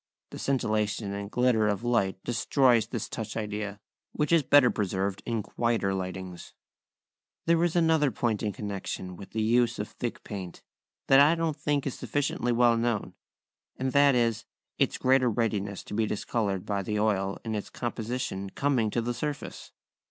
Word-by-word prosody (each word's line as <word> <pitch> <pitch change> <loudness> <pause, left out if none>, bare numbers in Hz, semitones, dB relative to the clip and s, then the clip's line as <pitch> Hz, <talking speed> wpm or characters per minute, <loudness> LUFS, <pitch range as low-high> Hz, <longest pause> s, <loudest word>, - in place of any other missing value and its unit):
The - - -8
scintillation 105 -5 0
and 100 0 -5
glitter 125 -2 +2
of 105 +1 -1
light 115 -6 +1
destroys 120 -1 +3
this 115 -2 -4
touch 110 -1 -5
idea, 105 -1 -4 0.3
which 150 +1 -1
is 165 -1 +6
better 140 -2 +5
preserved 100 -1 -2
in 115 -3 -1
quieter 115 -5 0
lightings. 95 -1 -6 0.9
There 170 0 +3
is 175 -1 +1
another 160 -4 +4
point 115 -2 -1
in 105 - -1
connection 95 -2 -5
with 100 - -10
the 110 0 -2
use 120 +2 +2
of - - -3
thick - - -5
paint, 95 -4 -7 0.4
that 135 - +6
I 150 +4 +6
don't 165 -2 -1
think 145 -2 -1
is 135 - -4
sufficiently 125 0 -1
well 120 -1 +4
known, 115 -2 -1 0.6
and 130 0 -1
that 140 0 +5
is, 115 -2 +1 0.4
its - - +2
greater 130 -1 +3
readiness 105 -4 -1
to - - -9
be 110 +1 +1
discoloured 100 -3 -2
by 100 -1 -1
the 105 +2 -2
oil 100 -2 +1
in 110 - -2
its 105 -2 -4
composition 115 -4 -4
coming 130 -3 +1
to 115 +2 -1
the 120 +1 -1
surface. 145 +4 -5
115 Hz, 165 wpm, -28 LUFS, 100-125 Hz, 0.9 s, is